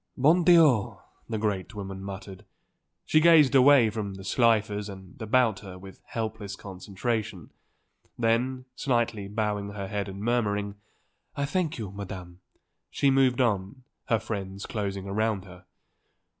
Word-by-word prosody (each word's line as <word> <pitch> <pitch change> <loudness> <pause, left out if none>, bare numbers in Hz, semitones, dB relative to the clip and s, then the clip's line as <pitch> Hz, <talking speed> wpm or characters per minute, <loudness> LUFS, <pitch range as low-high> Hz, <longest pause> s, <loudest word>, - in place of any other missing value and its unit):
"Bon 160 +7 +4
Dieu!" 160 - +5 0.3
the 110 - -2
great 105 -1 -2
woman 95 -1 -6
muttered. 100 -1 -8 0.6
She 155 - +4
gazed 155 -4 +6
away 130 -4 +6
from 105 -3 -4
the 95 - -9
Slifers 105 -2 +1
and 95 +2 -12
about 110 -2 +2
her 95 -3 -10
with 95 +1 -13
helpless 110 -3 -4
consternation. 100 0 -4 0.7
Then, 125 +3 0
slightly 120 -6 0
bowing 105 -1 -2
her 100 -2 -5
head 100 0 -3
and 95 0 -8
murmuring: 105 -4 0 0.6
"I 140 - -1
thank 165 +2 -1
you, 105 -5 -5
Madam," 95 -3 -8 0.5
she 140 - +2
moved 130 -1 +3
on, 105 +1 -1 0.2
her 115 - +2
friends 100 -3 -5
closing 100 -3 -4
round 105 0 -1
her. 90 -1 -14
105 Hz, 135 wpm, -27 LUFS, 100-120 Hz, 0.7 s, gazed